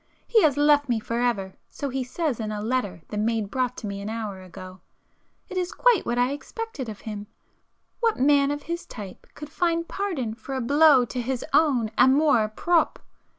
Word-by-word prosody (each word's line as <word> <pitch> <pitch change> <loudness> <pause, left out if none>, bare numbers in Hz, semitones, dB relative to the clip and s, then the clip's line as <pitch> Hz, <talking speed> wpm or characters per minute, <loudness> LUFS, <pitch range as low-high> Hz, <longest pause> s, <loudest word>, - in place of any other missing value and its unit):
He 450 -3 +4
has 290 -5 +3
left 290 -1 +4
me 235 -2 +1
for 230 +2 -3
ever, 205 -6 0 0.2
so 280 - -4
he 265 0 -2
says 275 0 -2
in 215 -1 -3
a 210 - -3
letter 215 -6 -2
the 210 - -3
maid 220 -1 -1
brought 250 -1 -1
to - - -6
me 200 -1 -5
an 205 - -5
hour 215 -4 -5
ago. 185 0 -11 0.7
It 370 - -6
is 360 0 -1
quite - - +3
what 240 0 0
I 245 +2 +2
expected 290 - -6
of 210 - -8
him,—what 220 - -6
man 280 +1 +4
of 290 0 -3
his 340 +1 -5
type 200 -5 -10
could 300 0 -9
find 335 0 0
pardon 330 - -3
for 240 +4 -7
a - - -1
blow 280 +1 +5
to 250 +1 -4
his 250 +1 -3
own 260 -8 +3
amour 265 -4 +5
propre! 335 +10 +1
255 Hz, 195 wpm, -25 LUFS, 220-300 Hz, 0.7 s, blow